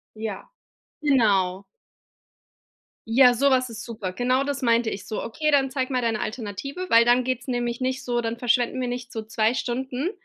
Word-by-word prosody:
Ja. 215 -3 -6 0.5
Genau. 200 -9 +2 1.4
Ja, 245 +2 +6
sowas 255 -1 +2
ist 225 +1 -7
super. 210 -6 -5
Genau 255 +5 +1
das 280 -1 -3
meinte 230 -1 +2
ich, 195 0 -7
so: 215 - -4
„Okay, 305 +7 -1
dann 270 -2 +3
zeig 260 -1 -2
mal 255 -2 0
deine 225 -2 0
Alternative“, 240 - -5
weil 230 0 +7
dann 245 +1 +3
geht's 255 +1 -3
nämlich 240 -1 -2
nicht 260 +1 -2
so 240 -1 0
dann 230 0 -3
verschwenden 245 +1 +1
wir 250 - -1
nicht 245 0 -5
so 220 - -4
2 220 +1 0
Stunden 260 +5 -2
245 Hz, 175 wpm, -24 LUFS, 225-260 Hz, 1.4 s, weil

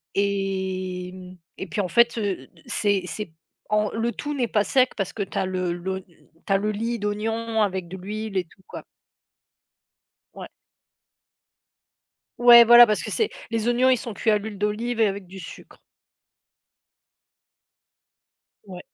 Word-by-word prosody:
et 190 -2 -2
mmh 185 0 -12 0.2
et 190 - -4
puis 205 +6 -2
en 180 - -3
fait, 235 +4 +3
heu, 195 -11 -3 0.2
c'est 205 -4 +1
c'est 195 -2 -6 0.4
en 210 0 +1
le 225 +1 -1
tout 295 0 -5
n'est 255 -4 -1
pas 210 -2 +1
sec 255 +5 +2
parce 195 -3 -3
que 205 - -3
tu 195 - -8
as 190 - +1
le 185 -1 -2
l'oign 190 +2 -5 0.4
tu 195 - +2
as - - +4
le 210 +2 -1
lit 230 +2 -3
d'oignon 220 +2 -2
avec 190 -4 -1
de 190 - -7
l'huile 210 +2 -5
et 180 - 0
tout 190 - -24
quoi. - - -9 1.5
Ouais. - - -9 1.9
Ouais 240 -1 +9
voilà, 240 +1 +9
parce 215 -2 0
que - - -5
c'est 445 - 0 0.2
les 225 -1 -1
oignons, 250 +2 +3
ils 255 - +4
sont 235 -2 -6
cuits 220 - 0
à 210 - +3
l'huile 205 -1 -8
d'olive 220 +3 -2
et 220 - +5
avec 195 -1 -6
du 190 +2 -11
sucre. 165 - -12 2.8
Ouais. 185 -2 -9
205 Hz, 160 wpm, -24 LUFS, 190-230 Hz, 2.8 s, Ouais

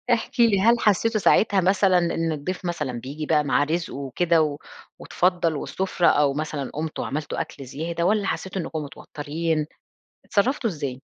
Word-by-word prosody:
احكي 235 0 +3
لي 200 -4 +2
هل 235 +3 +4
حسيتوا 215 +2 +2
ساعتها 200 -1 +4
مثلًا 190 0 +3
إن 165 -1 0
الضيف 170 +6 -4
مثلًا 155 -7 -2
بييجي 145 +5 -6
بقى 150 -1 +2
مع 145 +1 +2
رزقه 165 +3 -2
وكده 160 +5 +1
و 145 -1 -2 0.4
واتفضّل 175 -3 0
والسفرة 185 +3 -1
أو 145 -2 +4
مثلًا 150 -2 -3
قُمتوا 155 +1 -3
عملتوا 145 +2 -3
أكل 140 - -6
زيادة 165 +6 -3
والّا 210 0 +2
حسيتوا 190 -1 -3
إنِّكم 160 -1 -4
متوترين 155 +2 -3 0.6
إتصرفتوا 235 +3 +1
ازاي؟ 140 -6 -5
165 Hz, 155 wpm, -24 LUFS, 150-190 Hz, 0.6 s, هل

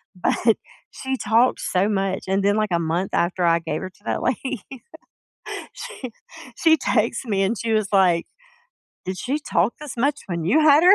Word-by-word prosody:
But 220 +5 +2 0.3
she 265 0 -3
talked 235 +2 +3
so 190 +3 +1
much, 195 -2 -1
and 190 +1 +1
then, 200 +1 +3
like, 215 -1 +1
a 170 - +2
month 170 +3 -1
after 180 +1 +1
I 170 0 +4
gave 160 -2 -3
her 185 - -5
to 185 - -28
that - - -1
lady, 250 -1 -1 1.1
she 460 - -8 0.4
she 320 +3 +4
texts 235 -1 0
me, 200 -4 +1
and 210 +4 0
she 230 +1 -2
was 215 -2 +2
like, 180 -4 +4 0.8
"Did 185 0 -4
she 270 +8 -1
talk 215 - +1
this 295 -5 -7
much 280 +4 +1
when 170 -3 -3
you 220 - +4
had 305 0 +6
her?" 370 +2 +9
210 Hz, 185 wpm, -23 LUFS, 185-255 Hz, 1.1 s, her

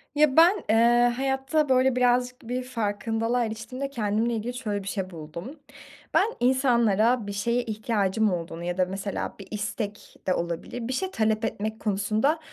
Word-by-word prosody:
Ya, 300 -2 +3
ben, 355 +5 +6
eee, 240 +2 +5
hayatta, 270 +3 0
böyle, 260 0 +4
birazcık 250 0 +2
bir 250 +1 -2
farkındalığa 230 0 -1
eriştiğimde 240 +5 -5
kendimle 225 -1 0
ilgili 230 +2 -3
şöyle 210 -5 -3
bir - - -10
şey 195 -2 -3
buldum. 170 - -8 0.5
Ben 385 - +5
insanlara 240 -3 +3
bir - - -3
şeye 235 +5 0
ihtiyacım 215 -2 0
olduğunu 170 -1 -5
ya 175 +1 -3
da 185 - +3
mesela 195 +2 -4
bir 195 - -10
istek 210 0 -5
de 185 - +3
olabilir, 170 +8 -4
bir 260 - -2
şey 380 +8 -2
talep 220 - +1
etmek 220 0 -3
konusunda, 215 +9 +1
225 Hz, 160 wpm, -26 LUFS, 205-250 Hz, 0.5 s, ben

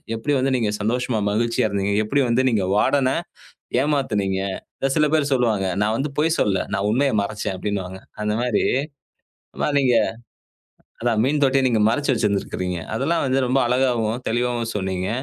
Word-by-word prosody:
எப்டி 145 +6 -1
வந்து 130 +1 +1
நீங்கச் 105 -4 -1
சந்தோஷமா, 120 +1 0
மகிழ்ச்சியா 115 +1 +1
இருந்தீங்க, 100 0 -1
எப்டி 140 +6 +1
வந்து 125 +3 +2
நீங்க 105 -5 +1
வாடன 130 +4 +3 0.7
ஏமாத்துனீங்கன்னு 105 -6 -1
சில 150 0 +4
பேர் 145 -2 +1
சொல்லுவாங்க. 110 -6 +1 0.2
நான் 110 +1 +1
வந்து 140 +1 -2
பொய் 160 +2 +2
சொல்லல. 100 -2 +1
நான் 100 - 0
உண்மையை 135 +3 +2
மறைச்சேன் 100 -1 -3
அப்டின்னுவாங்க. 95 -1 -4 0.2
அந்த 105 0 0
மாதிரி 125 -4 +1 1.2
நீங்க 130 -3 +3 1.1
அதான் 115 -2 +1
மீன் 145 +2 +1
தொட்டிய 135 0 +3
நீங்க 110 -3 +1
மறைச்சு 145 +5 0
வச்சிருந்திருக்கீங்க. 95 -5 -1
அதெல்லாம் 140 +8 0
வந்து 130 0 +1
ரொம்ப 130 +2 +2
அழகாவும், 120 -2 +1
தெளிவாவுமே 120 0 -1
சொன்னீங்க. 95 -2 -2
115 Hz, 145 wpm, -22 LUFS, 105-130 Hz, 1.2 s, சில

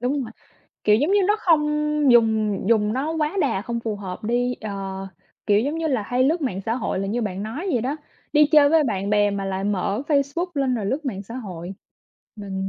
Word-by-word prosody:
đúng 270 +3 0
mà, 225 - -9 0.5
kiểu, 210 0 +5
giống 295 - +1
như 410 - +4
nó 420 - +4
không 325 -4 +4 0.5
dùng 220 -3 +3
dùng 215 -2 +3
nó 285 +6 -1
quá 310 +2 -1
đà 190 - 0
không 235 0 -3
phù 220 -2 -3
hợp 190 0 -7
đi, 245 +2 0
ờ, 215 -2 -5 0.8
kiểu, 205 0 +4
giống 285 +6 -1
như 325 - -1
là 255 -8 0
hay 245 +5 0
lướt 325 +5 +2
mạng 195 -8 -2
xã 225 - +1
hội 235 -6 -2
là 195 - -2
như 235 +4 -1
bạn 195 -2 -3
nói 285 - -4
vậy 245 - +1
đó, 270 +6 -2 0.4
đi 300 -1 +6
chơi 290 -2 +7
với 320 -1 +4
bạn 200 -3 -2
bè 205 -1 +3
mà 200 -1 -3
lại 195 0 -3
mở 205 +3 -1
Facebook 285 +4 +1
lên 270 -3 +1
rồi 215 -4 -2
lướt 275 +8 -2
mạng 200 -7 -3
xã 230 +4 -10
hội. 185 -7 -7 0.6
Mình 195 -2 -4
230 Hz, 225 wpm, -23 LUFS, 205-280 Hz, 0.8 s, chơi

